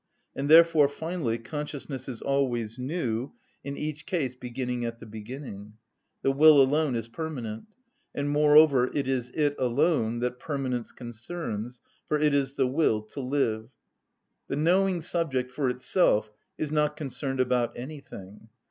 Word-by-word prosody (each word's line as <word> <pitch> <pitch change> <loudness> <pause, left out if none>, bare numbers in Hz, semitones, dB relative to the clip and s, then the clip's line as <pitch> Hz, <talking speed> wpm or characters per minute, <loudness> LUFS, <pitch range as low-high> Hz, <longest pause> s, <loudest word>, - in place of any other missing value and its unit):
And 140 +1 -2
therefore, 160 -2 +7
finally, 160 -6 -3
consciousness 145 +1 -5
is 120 - -6
always 125 -5 -1
new, 130 -3 -2 0.3
in 140 0 -5
each 150 +1 -5
case 160 -10 -1
beginning 125 0 -4
at 115 0 -4
the 115 - -11
beginning. 110 -1 -8 0.5
The 135 - +3
will 150 +1 +7
alone 140 0 +3
is 115 -1 -3
permanent; 115 -5 -5 0.5
and, 145 0 -1
moreover, 150 -3 +5
it 140 - 0
is 125 -2 -1
it 145 -2 +1
alone 120 -1 +1
that 125 0 -2
permanence 130 -5 -3
concerns; 120 -1 -6 0.3
for 150 - +1
it 150 -1 +3
is 140 -1 0
the 135 - +2
will 125 -5 +1
to 110 - -9
live. 125 -5 -1 0.8
The - - -2
knowing 180 +4 +2
subject 140 -7 -1
for 135 0 0
itself 125 - +2 0.3
is 150 -1 -3
not 150 -1 +1
concerned 135 -2 -3
about 125 -2 +1
anything. 110 -7 -10
135 Hz, 145 wpm, -27 LUFS, 120-150 Hz, 0.8 s, therefore